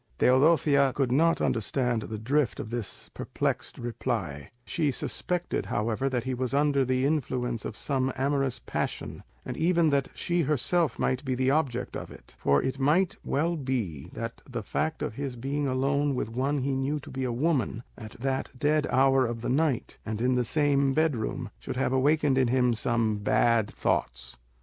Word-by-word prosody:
Teodosia 140 0 +4
could 135 -3 +1
not 165 +5 +3
understand 120 +1 0
the 110 0 -5
drift 135 +5 0
of 110 - -5
this 120 -4 -5
perplexed - - -2
reply; 90 - -3 0.2
she 155 -4 0
suspected, 175 +6 -2
however, 115 +5 0
that 125 -3 -1
he 130 +1 -2
was 130 +1 -2
under 140 -1 +3
the 130 +1 +1
influence 125 -5 -1
of 110 - -5
some 135 -2 0
amorous 135 -1 0
passion, - - -4 0.2
and - - -4
even 165 -1 +3
that 140 -1 +2
she 175 -1 0
herself 155 +3 +1
might 130 +1 0
be 130 -2 -1
the 130 +1 +2
object 140 -5 0
of - - -5
it; - - -15
for 70 0 +3
it 130 +1 -2
might 175 +9 +2
well 165 +4 0
be 120 - -3
that - - -6
the - - -4
fact 160 +1 -2
of - - -3
his 135 +1 -4
being 140 +4 -2
alone 140 +2 +1
with 120 - -2
one 135 +5 0
he 135 0 0
knew 135 +3 -1
to 145 0 -11
be 130 0 -3
a 125 - -1
woman, 125 -3 0
at 110 -3 -9
that 130 +2 -2
dead 150 +2 +2
hour 135 -1 +4
of 115 -1 -4
the - - -2
night, 135 -2 0
and 110 -1 -4
in 125 +2 +2
the 125 0 +2
same 140 +1 +2
bed 155 -3 +3
room, 120 +1 -4
should - - -5
have 130 -1 +1
awakened 140 0 +3
in 130 - +3
him 125 0 +3
some 115 -1 0
bad 115 +1 +2
thoughts. - - -2
130 Hz, 185 wpm, -28 LUFS, 120-145 Hz, 0.2 s, Teodosia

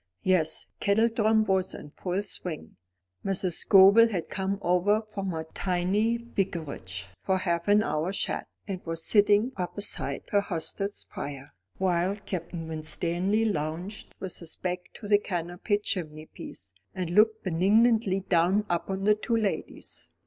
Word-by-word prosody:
'" 95 - -46
Yes, 175 -4 +2
kettledrum 220 +1 +3
was 190 -2 +1
in 145 - -10
full 185 +5 -2
swing. 175 -5 -6 0.5
Mrs. 190 -2 -1
Scobel 200 +6 +7
had 185 -6 -3
come 195 0 -1
over 190 +5 +3
from 200 -3 -5
her 160 -2 -3
tiny 195 +5 +1
Vicarage 170 - -4
for 190 -1 +1
half 170 -2 -1
an 205 +1 +5
hour's 170 +1 -1
chat, - - -2 0.2
and 190 -3 -4
was 165 -1 -4
sitting 210 +3 +4
opposite 190 +3 -3
her 205 - +4
hostess's 195 +2 -2
fire, 140 0 -6 0.2
while 185 +1 +1
Captain 175 -4 -5
Winstanley 175 +6 0
lounged 175 +2 -3
with 190 -3 -3
his 165 -2 -4
back 180 0 -2 0.2
to 210 - -8
the 205 0 +5
canopied 180 +3 -2
chimneypiece, 155 - -6 0.2
and 180 -3 -3
looked 220 +3 +4
benignantly 200 +3 +3
down 185 +3 +2
upon 190 +3 -1
the 210 +1 +5
two 230 +2 -1
ladies. 200 - -3
190 Hz, 140 wpm, -28 LUFS, 170-205 Hz, 0.5 s, Scobel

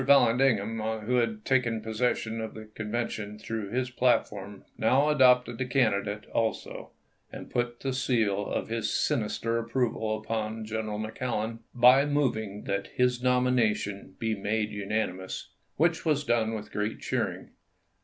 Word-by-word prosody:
Vallandigham, 115 -5 +4 0.2
who 125 +4 0
had 115 -3 0
taken 120 -4 +2
possession 110 0 -1
of 110 - -6
the 110 0 -8
Convention 110 -1 -4
through 110 -1 -4
his 125 +3 -1
platform, 105 -6 0
now 135 +6 +3
adopted 125 -5 +4
the 130 - 0
candidate 105 -5 +1
also, 115 -1 -2 0.4
and - - -9
put 120 0 -2
the 135 -1 -1
seal 115 -6 +1
of - - -2
his 115 -1 -1
sinister 115 -3 0
approval 115 -2 -1
upon 110 0 -3
General 110 -1 -3
McClellan 110 0 -3 0.2
by 125 +3 +7
moving 115 -8 -1
that 100 0 -2
his 125 -1 +2
nomination 120 -5 +1
be 115 -1 -1
made 105 +1 -1
unanimous, 95 -3 -3 0.3
which 165 +2 +2
was 150 -3 +1
done 115 -4 +1
with 105 -1 -7
great 105 +1 -2
cheering. - - -2
115 Hz, 135 wpm, -28 LUFS, 105-125 Hz, 0.4 s, by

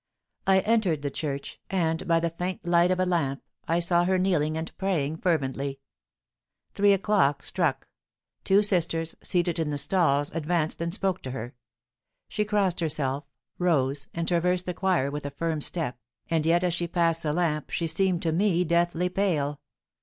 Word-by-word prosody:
I 190 0 +5
entered 200 -10 +1
the 140 - -2
church, 140 -2 -5
and, 165 -3 0
by 165 -1 +4
the 165 0 -1
faint 180 +2 -4
light 175 0 +4
of 185 0 +1
a 185 - +3
lamp, 150 -7 -1 0.2
I 165 - +2
saw 175 0 +2
her 185 +1 +2
kneeling 160 -5 +1
and 160 0 -5
praying 160 -6 0
fervently. 140 -5 -1 0.9
Three 205 0 +4
o'clock 185 -8 +2
struck; 160 -7 -1 0.6
two 200 +2 +4
sisters, 165 -4 0
seated 175 -2 0
in 160 -2 0
the 145 - -2
stalls, 145 -3 +1
advanced 165 0 -1
and 170 0 -1
spoke 190 -1 -1
to 130 - -6
her; 125 0 -6 0.7
she 210 - -1
crossed 200 -4 +1
herself, 145 -3 -1 0.3
rose, 140 -6 +1
and 165 0 -2
traversed 180 +1 +1
the 180 - -2
choir 180 -7 +1
with 145 +1 -5
a - - -3
firm 160 +2 -2
step, 150 -6 -2 0.3
and 160 -1 +1
yet 170 +2 +3
as 180 -2 +1
she 175 0 -2
passed 165 -1 +1
the 150 - -1
lamp 155 -2 -1
she 170 - -1
seemed 175 +2 +1
to 165 - +1
me 180 +1 +2
deathly 170 +1 +1
pale. 165 -7 -1
170 Hz, 175 wpm, -27 LUFS, 150-180 Hz, 0.9 s, I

